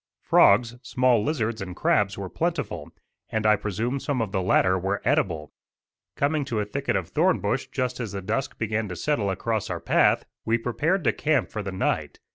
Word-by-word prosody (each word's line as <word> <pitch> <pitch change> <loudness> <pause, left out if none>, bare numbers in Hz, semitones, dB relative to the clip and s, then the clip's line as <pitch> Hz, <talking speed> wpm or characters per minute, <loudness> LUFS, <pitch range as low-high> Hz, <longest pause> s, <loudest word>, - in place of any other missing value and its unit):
Frogs, 115 +4 +4
small 125 -5 +2
lizards 115 -7 -1
and 90 -2 -6
crabs 100 +1 +1
were 100 -1 -4
plentiful, 155 - -3 0.4
and 110 -1 -2
I 105 0 +6
presume 110 +6 -2
some 140 -2 -2
of 110 -4 -1
the 95 - 0
latter 95 0 +3
were 95 +2 -1
edible. 95 - 0 0.6
Coming 145 +1 +1
to 115 -5 -2
a 105 - 0
thicket 100 - -2
of - - -2
thorn - - +2
bush - - -1
just 125 -1 -2
as 115 -5 -4
the 100 - -4
dusk 115 +8 -2
began 110 0 -1
to 90 - -5
settle 115 - 0
across 110 +3 -2
our - - -3
path, - - +3 0.2
we 115 +1 +2
prepared 145 - 0
to - - +2
camp 155 +1 +1
for 110 - -3
the 100 -1 -5
night. 95 - -2
110 Hz, 195 wpm, -25 LUFS, 100-130 Hz, 0.6 s, I